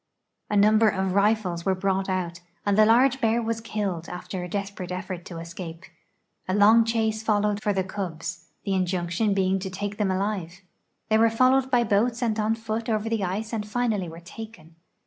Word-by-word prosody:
A 210 - +1
number 215 +2 +5
of 190 -2 -1
rifles 200 -4 +1
were 190 0 +1
brought 195 0 -1
out, 175 -2 -2 0.3
and 205 -1 +2
the 215 +1 +6
large 260 +3 +4
bear 230 0 +2
was 225 -1 -2
killed 200 -7 -3
after 180 +1 -5
a 180 - -6
desperate 195 -1 -4
effort 185 -1 -5
to 170 - -8
escape. 165 +1 -8 0.6
A 185 - 0
long 220 +3 +6
chase 220 -1 0
followed 210 -1 +1
for 210 - +1
the 190 -1 0
cubs, 170 -3 -5 0.2
the 200 - -1
injunction 185 +2 0
being 190 0 +2
to 190 0 -4
take 205 +2 -5
them 205 -2 +1
alive. 190 -2 -2 0.5
They 220 0 +4
were 230 0 +5
followed 255 +3 +3
by 245 -2 +3
boats 230 +3 +1
and 220 -2 0
on 215 +1 +1
foot 225 +1 -4
over 220 0 0
the 225 -3 0
ice 210 +5 -3
and 220 -2 -1
finally 215 -5 -1
were 165 +1 -10
taken. 175 -3 -11
205 Hz, 190 wpm, -25 LUFS, 185-220 Hz, 0.6 s, the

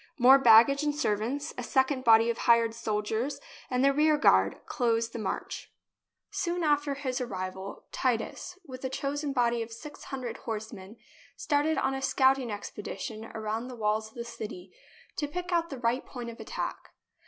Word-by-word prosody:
More 265 +1 +8
baggage 240 +3 +7
and 295 -1 0
servants, 275 +3 -1
a - - -1
second 265 +2 +1
body 230 -1 +6
of 230 - -6
hired 230 -1 +4
soldiers, 220 +3 -2 0.3
and 250 +1 +2
the 275 - +5
rear 305 +1 +4
guard, 95 - +4
closed 230 -1 0
the 235 - -4
march. 210 - -4 0.6
Soon 350 -1 -1
after 290 -2 +2
his 265 -2 -3
arrival, 190 -3 -5
Titus, 255 +8 -2
with 255 -3 -9
a 260 - -1
chosen 285 +2 -2
body 240 -3 +1
of 225 0 -6
six 245 +6 -10
hundred 255 -4 -5
horsemen, 220 -2 -7 0.4
started 300 +2 +1
on 270 - +1
a 270 - -3
scouting 265 -2 +3
ex 205 -1 -5
pedition 215 +1 -6
around 220 +2 -3
the 255 - -8
walls 215 -1 0
of - - -25
the 235 -1 -5
city 210 -6 -8 0.5
to 295 - -1
pick 360 +4 -5
out 340 -1 +1
the 275 - -6
right 240 +1 0
point 240 -3 -7
of 230 - -14
attack. - - -5
245 Hz, 175 wpm, -29 LUFS, 225-275 Hz, 0.6 s, More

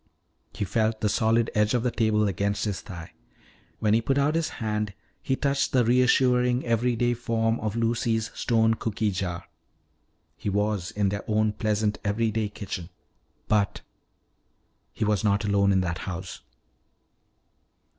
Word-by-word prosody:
He 100 - -2
felt 110 +3 0
the 105 - +2
solid 115 +2 +2
edge 105 +2 +2
of 120 - 0
the 125 - +1
table 110 -2 +2
against 100 +3 -1
his 100 -3 -3
thigh. 85 -5 -9 0.7
When 105 -1 +1
he 115 - +4
put 135 +4 0
out 140 +2 +2
his 165 0 0
hand 105 -2 -2 0.3
he 130 - 0
touched 140 0 0
the 125 -3 +4
reassuring 125 0 +3
everyday 120 +1 +1
form 115 -1 0
of 110 0 -3
Lucy's 115 -1 0
stone 115 -1 +2
cooky 110 -1 -1
jar. 90 -1 -4 0.9
He 85 - -4
was 105 -2 0
in 100 -1 0
their 100 +1 -3
own 110 0 +2
pleasant 105 0 0
everyday 110 +1 0
kitchen. 100 -4 -6 0.6
But 105 -2 +1 1.1
He 110 - -2
was 105 -3 +1
not 100 0 +2
alone 100 -1 +3
in 95 -1 +3
that 85 -1 -2
house! 95 0 -6
110 Hz, 145 wpm, -26 LUFS, 100-115 Hz, 1.1 s, he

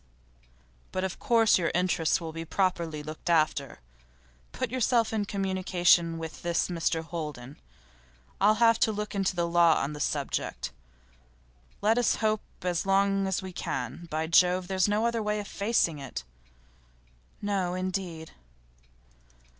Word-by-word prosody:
'But 185 - -2
of 190 -2 -3
course 225 -4 +4
your 165 - +1
interests 180 -2 +2
will 165 -2 -6
be 165 0 -5
properly 170 -3 -1
looked 155 +3 -7
after. 155 - +1 0.7
Put 255 -3 -3
yourself 235 -3 +2
in 210 -2 0
communication 180 -4 +2
with 160 -1 -7
this 170 +1 0
Mr 165 -1 -1
Holden. 150 -6 -7 0.8
I'll 210 +2 +5
have 230 0 +4
a - - 0
look 210 0 -4
into 195 -2 0
the 170 -1 0
law 170 -1 +5
on 145 +2 -2
the 150 - -7
subject. 145 - -2 1.1
Let 220 +3 +4
us 245 - +2
hope 215 -1 0 0.2
as 175 -2 0
long 195 0 +2
as 190 0 -1
we 190 -1 -7
can. 170 0 -4
By 155 0 -1
Jove! 180 +2 +3
There's 190 0 +2
no 210 +2 +1
other 235 -1 0
way 210 0 -1
of 205 - -6
facing 200 -7 0
it.' 135 - -6 1.2
'No, 195 -3 -1
indeed. 185 -3 -4
185 Hz, 145 wpm, -28 LUFS, 165-205 Hz, 1.2 s, I'll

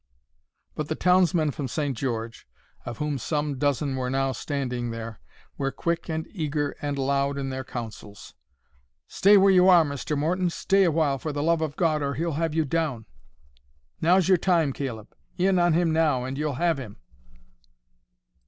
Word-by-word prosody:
But 150 - -4
the 155 - -2
townsmen 180 -4 +3
from 140 -1 -4
St. 145 +1 -2
George, 115 -1 -4 0.4
of 120 - -5
whom 150 -2 -2
some 145 +2 -2
dozen 140 -1 0
were 130 -1 -2
now 135 +1 0
standing 125 -4 -3
there, 115 -1 -7 0.4
were 135 -1 0
quick 170 +3 -3
and 160 0 -2
eager 150 -5 -2
and 145 -1 -2
loud 140 +1 0
in 135 -1 -3
their 130 0 -4
counsels. 110 -5 -8 0.7
"Stay 205 +2 +5
where 195 0 +5
you 185 0 +6
are, 175 -3 +7
Mr. 145 +1 -3
Morton,—stay 180 +4 +1
awhile 155 -5 +1
for 155 - -4
the 145 0 -3
love 165 0 +2
of 155 -2 -3
God—or 155 -5 0
he'll 165 +2 -1
have 160 +1 -2
you 160 -1 +2
down." 145 -7 -2 1.0
"Now's 180 +2 +4
your 185 -2 +4
time, 165 -7 +2
Caleb; 120 -6 -6 0.2
in 185 0 +2
on 175 -1 +3
him 165 -1 +2
now, 155 -6 +2
and 130 +1 -4
you'll 150 -1 -2
have 165 +1 +1
him." 110 -6 -9
150 Hz, 165 wpm, -25 LUFS, 135-165 Hz, 1.0 s, are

